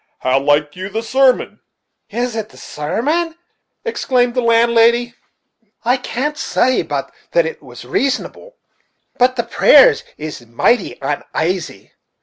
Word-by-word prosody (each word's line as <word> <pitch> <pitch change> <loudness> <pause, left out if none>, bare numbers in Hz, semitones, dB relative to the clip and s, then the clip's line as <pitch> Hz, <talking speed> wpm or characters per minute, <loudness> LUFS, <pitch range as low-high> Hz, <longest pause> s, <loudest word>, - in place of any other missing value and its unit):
How 130 +1 +2
liked 145 +1 +1
you 185 +1 -6
the 220 +3 -3
sermon?" 260 +2 +2 0.5
"Is 240 +2 -3
it 220 -1 -4
the - - -18
sarmon?" 300 - -2 0.5
exclaimed 250 - 0
the 250 - 0
landlady. 235 +1 +3 0.7
"I 250 +3 +3
can't 290 +4 -3
say 255 0 +1
but - - -4 0.2
it - - +1
was - - -12
rasonable; 390 - -2 0.7
but 255 +1 +3
the 235 - -1
prayers 475 - +5
is 150 -5 -7
mighty 185 - +1
unasy. 160 - -3
235 Hz, 125 wpm, -17 LUFS, 185-260 Hz, 0.7 s, prayers